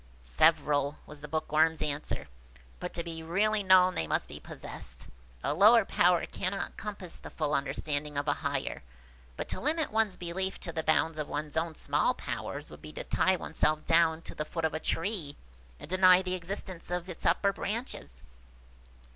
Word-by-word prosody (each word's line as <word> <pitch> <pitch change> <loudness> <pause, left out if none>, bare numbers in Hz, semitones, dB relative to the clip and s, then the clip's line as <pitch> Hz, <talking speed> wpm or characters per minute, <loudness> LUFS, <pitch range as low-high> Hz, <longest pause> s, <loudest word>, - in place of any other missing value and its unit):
"Several," 145 - +2
was 150 -1 -11
the 150 - -7
Bookworm's 155 +1 +2
answer; 150 -1 -2 0.5
"but 180 - -4
to 170 - -1
be 165 -1 -6
really 205 +6 +1
known 185 -1 +6
they 80 - -1
must - - 0
be - - -8
possessed. - - -7 0.4
A - - +1
lower 215 +6 +7
power 175 -2 +3
cannot 190 +2 -3
compass 200 -5 -6
the - - -9
full 150 -2 -2
understanding 145 +1 -1
of 145 +1 -1
a 145 - +4
higher. 140 -3 -2 0.6
But - - -4
to - - -2
limit 310 +3 +1
one's 215 -3 +2
belief 185 +2 -3
to 170 - -4
the 160 - -1
bounds 155 0 +1
of 150 - -2
one's 150 0 -4
own 160 0 -1
small 150 - +1
powers, - - -5
would - - -12
be - - -9
to - - -5
tie 190 - +2
oneself 155 -2 0
down 165 0 +3
to - - -7
the 150 - -3
foot 165 +1 -3
of 160 - 0
a 155 - -2
tree, 165 -4 -2 0.4
and - - -8
deny 185 +1 +6
the 185 0 -2
existence 185 0 -5
of 175 0 -2
its 180 - -5
upper 195 +4 +3
branches." 200 - -5
165 Hz, 180 wpm, -30 LUFS, 150-190 Hz, 0.6 s, lower